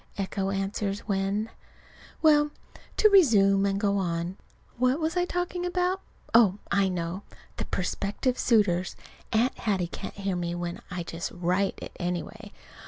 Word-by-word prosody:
Echo 195 0 -2
answers 195 +1 -2
when. 200 +2 -1 0.7
Well, 295 -1 +5 0.5
to 430 - +7
resume 200 - +5
and 195 0 0
go 200 -1 +1
on. 170 0 -2 0.4
What 255 +4 +3
was 320 +1 -1
I 355 0 +2
talking 355 0 -2
about? 360 +1 0 0.3
Oh, 215 -4 +6
I 195 -1 +3
know 175 +1 -3 0.4
the - - -3
prospective 200 +7 -1
suitors. 185 -6 +2 0.4
(Aunt 230 +3 +2
Hattie 195 -5 0
can't 170 - -7
hear 195 -1 -2
me 175 -1 -2
when 175 0 -4
I 180 -2 -4
just 170 +2 -5
write 180 +3 0
it, - - -9
anyway.) 180 +4 -4
200 Hz, 145 wpm, -27 LUFS, 180-240 Hz, 0.7 s, to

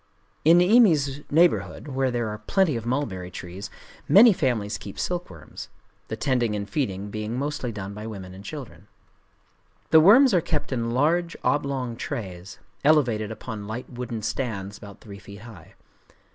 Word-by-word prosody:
In 165 +3 +6
Niimi's 175 - +4
neighborhood, 145 - +2
where 135 -1 0
there 120 -2 -1
are 105 0 -6
plenty 170 - +1
of 115 -1 -4
mulberrytrees, 95 -7 -4 0.4
many 220 +3 +8
families 120 - -1
keep 100 - -9
silkworms;—the 110 - -7
tending 120 -3 0
and 100 -1 -4
feeding 100 -7 -3
being 110 +3 -4
mostly 140 -3 -3
done 100 -2 -6
by 105 +2 -7
women 95 -4 -8
and 95 +1 -11
children. 140 +1 -9 1.0
The 160 - +8
worms 230 - +7
are 180 - +4
kept 150 -3 -3
in 115 -3 -1
large 165 +8 +1
oblong 135 -4 -1
trays, 95 - -6 0.3
elevated 125 -8 +3
upon 110 -2 -7
light 110 +4 -6
wooden 120 -3 -5
stands 100 -6 -3
about 100 -1 -12
three 100 -3 -11
feet 100 +1 -12
high. 110 -8 -13
120 Hz, 145 wpm, -25 LUFS, 100-145 Hz, 1.0 s, many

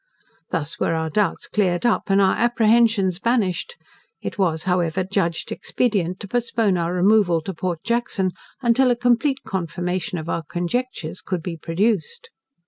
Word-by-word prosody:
Thus 160 -3 -3
were 165 - +1
our 160 0 -2
doubts 200 0 0
cleared 185 -2 0
up, 240 - +2
and 195 0 +4
our 190 -1 +4
apprehensions 225 -5 +3
banished; 230 - 0 0.4
it - - -6
was, 160 -5 +1
however, 180 -1 +1
judged 185 -3 -1
expedient 195 -7 -1
to 200 - -6
postpone 230 -3 +1
our 170 -1 -1
removal 180 -1 +3
to 190 - -5
Port 170 -1 -3
Jackson, 235 -5 0 0.3
until 250 +2 +4
a 245 - +3
complete 245 +3 +1
confirmation 180 -1 -3
of 160 0 -6
our 170 - -1
conjectures 175 +1 -3
could 185 -3 -3
be 175 -2 -4
procured. 185 +6 +1
190 Hz, 150 wpm, -22 LUFS, 175-230 Hz, 0.4 s, and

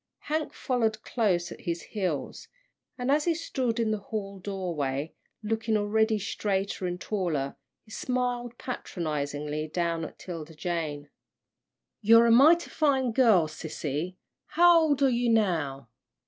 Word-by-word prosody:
Hank 310 +1 -2
followed 225 -4 -1
close 185 -7 0
at - - -9
his 170 -2 -3
heels, 185 -9 -3 0.5
and 250 +1 0
as 295 +1 +3
he 340 -2 +2
stood 255 -8 -2
in 225 -2 +1
the 215 - -1
hall 200 -2 -5
doorway, 165 -7 -3 0.3
looking 225 +1 0
already 220 +1 +2
straighter 195 -2 -2
and 180 0 -4
taller, 170 -10 -2 0.3
he 220 - -19
smiled 245 -1 -2
patronisingly 150 - -3
down 170 0 -1
at - - -7
'Tilda 165 -3 -8
Jane. 150 -3 -3 0.9
"You're 230 +2 +7
a 230 - +4
mighty 310 +9 +6
fine 270 -5 +2
girl, 220 -9 +4
sissy, 155 +2 -4 0.3
how 345 +2 +6
old 290 -3 +2
are - - +6
you 245 -1 +1
now?" 160 - 0
205 Hz, 135 wpm, -28 LUFS, 165-245 Hz, 0.9 s, You're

